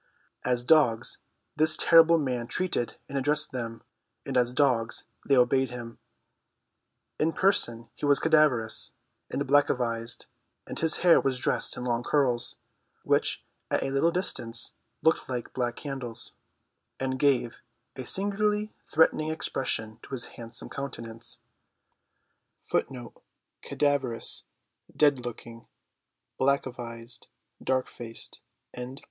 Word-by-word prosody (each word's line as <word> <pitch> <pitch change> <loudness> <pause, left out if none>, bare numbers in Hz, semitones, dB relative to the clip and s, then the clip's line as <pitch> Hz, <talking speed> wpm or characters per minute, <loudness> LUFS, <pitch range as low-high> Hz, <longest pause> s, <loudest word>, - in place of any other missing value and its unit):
As 125 -1 +1
dogs 120 -6 +3 0.4
this 155 +1 +4
terrible 165 0 +7
man 125 -6 -2
treated 145 -3 -1
and 140 - -8
addressed 150 +3 +1
them, 115 -3 -5 0.4
and - - -4
as 125 -1 +3
dogs 125 -4 +1 0.2
they 140 - +4
obeyed 130 +1 +3
him. 120 -1 -8 1.2
In 160 +1 +2
person 120 - +2
he 145 - -3
was 145 -1 +5
cadaverous 150 -8 +2 0.4
and - - -2
blackavized, 120 -4 +1 0.4
and - - -5
his 160 -1 +1
hair 170 - +7
was 130 -2 0
dressed - - +1
in 125 - -4
long 120 -1 0
curls, 125 -4 +1 0.5
which - - +1 0.2
at - - +1
a 135 - -2
little 140 +5 +3
distance 120 - -2 0.3
looked 160 -3 +2
like 125 -2 -4
black 120 -2 -1
candles, 125 -5 -5 0.7
and 130 0 -2
gave 130 -4 +2 0.3
a 130 - -5
singularly 210 - 0
threatening 155 -1 +3
expression 115 -8 -1
to - - -14
his 130 -3 -1
handsome 115 -1 -6
countenance. 115 -5 -6
130 Hz, 100 wpm, -28 LUFS, 120-155 Hz, 1.2 s, terrible